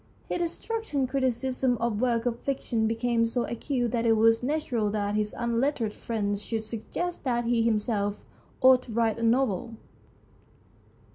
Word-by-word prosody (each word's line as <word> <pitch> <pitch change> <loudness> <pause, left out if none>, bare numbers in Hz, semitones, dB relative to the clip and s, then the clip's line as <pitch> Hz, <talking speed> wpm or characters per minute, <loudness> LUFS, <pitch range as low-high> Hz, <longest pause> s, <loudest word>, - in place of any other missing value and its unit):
His - - -1
destructive 340 - -2
criticism 260 -1 0
of 235 -2 -1
works 235 -2 +1
of 240 -1 -1
fiction 240 -5 -1
became 230 +1 +1
so 235 +1 +1
acute 245 -1 -2
that 235 -1 0
it 230 -1 +4
was 225 +1 +4
natural 250 -6 0
that 205 -1 -1
his 210 0 -1
unlettered 235 -1 0
friends 205 -3 -2
should 225 0 -3
sug 220 0 -6
gest 355 0 -3
that 240 -3 0
he 235 -1 +2
himself 210 -2 0 0.4
ought 255 -1 +7
to 250 - -11
write 230 -1 +1
a - - -3
novel. 230 -2 +1
235 Hz, 155 wpm, -27 LUFS, 220-255 Hz, 0.4 s, ought